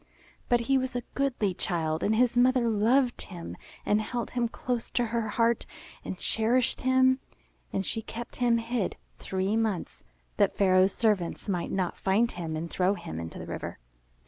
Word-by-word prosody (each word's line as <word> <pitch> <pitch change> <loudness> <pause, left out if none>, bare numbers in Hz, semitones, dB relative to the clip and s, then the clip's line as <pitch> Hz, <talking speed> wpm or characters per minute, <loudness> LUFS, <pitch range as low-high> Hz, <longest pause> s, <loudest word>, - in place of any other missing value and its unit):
But 240 -1 +4
he 265 +3 +2
was 255 -1 -3
a 245 - -1
goodly 250 -8 0
child, 160 -3 -1
and 215 - +2
his 245 +1 +3
mother 250 0 +4
loved 240 +4 +2
him 175 -3 -7 0.3
and 210 +1 +3
held 240 +2 -3
him 240 -1 0
close 240 0 -3
to 245 - +1
her 230 -1 -1
heart 230 +1 +1 0.4
and 185 - -5
cherished 235 +6 +1
him. 260 0 +4 0.5
And 195 - -1
she 225 - -1
kept 235 +2 -8
him 240 -2 +3
hid 230 -2 -1 0.2
three 190 +2 -1
months 220 -6 -1 0.4
that - - +3
Pharaoh's 190 -1 +4
servants 210 -6 0
might 180 -4 -1
not 185 -2 -1
find 215 +5 +2
him 165 -2 -4
and 160 +2 -3
throw 185 +3 +1
him 80 - -6
into 80 0 -6
the - - -6
river. - - -5
225 Hz, 170 wpm, -28 LUFS, 190-245 Hz, 0.5 s, But